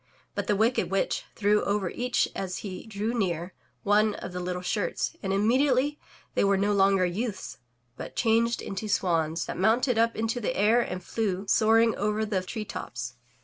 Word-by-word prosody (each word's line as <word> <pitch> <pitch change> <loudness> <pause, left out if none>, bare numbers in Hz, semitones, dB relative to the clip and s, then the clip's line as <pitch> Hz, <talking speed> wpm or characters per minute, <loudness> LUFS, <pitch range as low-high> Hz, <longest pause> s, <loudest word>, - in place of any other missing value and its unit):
But - - -3
the 210 - +2
wicked 225 +5 +2
witch 195 0 0
threw 210 0 +2
over 200 -3 0
each 245 0 0
as 185 -2 -3
he 185 +2 -7
drew 215 +2 -2
near, 180 -5 -1 0.3
one 210 +1 +3
of 180 - -7
the 180 - -3
little 180 0 -3
shirts, 485 - -1
and 195 - -2
immediately 255 +7 +2 0.3
they - - +2
were 200 0 +3
no 205 +2 +1
longer 195 -1 +4
youths, 205 +5 -4 0.4
but - - -8
changed 230 0 +2
into 195 +2 -4
swans, 165 -4 +1
that - - -5
mounted 225 +4 +3
up 230 0 +2
into 225 +2 -1
the 245 +3 -2
air 220 +4 +4
and 185 -5 -4
flew, 200 -4 -2
soaring 225 +2 +4
over 210 +1 0
the 200 -3 -1
tree 215 +4 -5
tops. 120 - -6
210 Hz, 180 wpm, -27 LUFS, 190-225 Hz, 0.4 s, longer